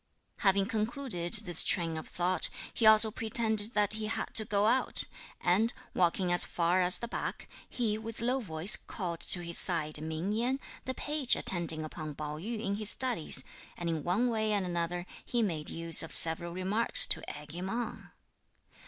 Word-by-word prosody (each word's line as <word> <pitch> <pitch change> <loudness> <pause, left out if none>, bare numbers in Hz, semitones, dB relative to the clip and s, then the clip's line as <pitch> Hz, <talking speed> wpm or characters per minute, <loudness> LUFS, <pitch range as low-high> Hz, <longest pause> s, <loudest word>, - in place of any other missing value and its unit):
Having 195 -2 +2
concluded 215 -4 -3
this 195 -7 +4
train 165 -3 0
of 155 - -7
thought, 180 +1 -1 0.2
he 225 - +2
also 220 0 +7
pretended 220 -1 +1
that 210 -1 +2
he 215 0 -4
had 220 - -4
to 220 - +5
go 205 -1 0
out, 255 +4 +2 0.4
and, 210 +7 +1 0.2
walking 180 0 0
as 175 - +7
far 175 +2 0
as 180 +1 +4
the 235 - -6
back, - - -6 0.2
he, 220 -3 -1
with 225 0 -8
low 250 +3 -1
voice, 180 -2 +4
called 175 -5 -6
to 175 - +1
his 170 0 -3
side 155 -4 -1
Ming 160 +5 -4
Yen, 245 +5 -1 0.3
the 260 - -4
page 295 -4 +1
attending 170 -3 +2
upon 155 -1 -8
Pao 150 0 -6
yü 220 +6 -5
in 200 -2 -3
his 215 -1 0
studies, 230 - +2 0.3
and 170 -1 -4
in 160 -3 -3
one 195 +8 0
way 220 -2 -1
and 200 -2 -1
another, 175 0 -3 0.2
he 240 -2 -1
made 160 -7 -4
use 165 0 +3
of 165 - -7
several 165 +1 -1
remarks 190 +6 +5
to - - 0 0.2
egg 150 0 -11
him 180 +2 -5
on. 230 +1 -5
195 Hz, 180 wpm, -30 LUFS, 170-225 Hz, 0.4 s, also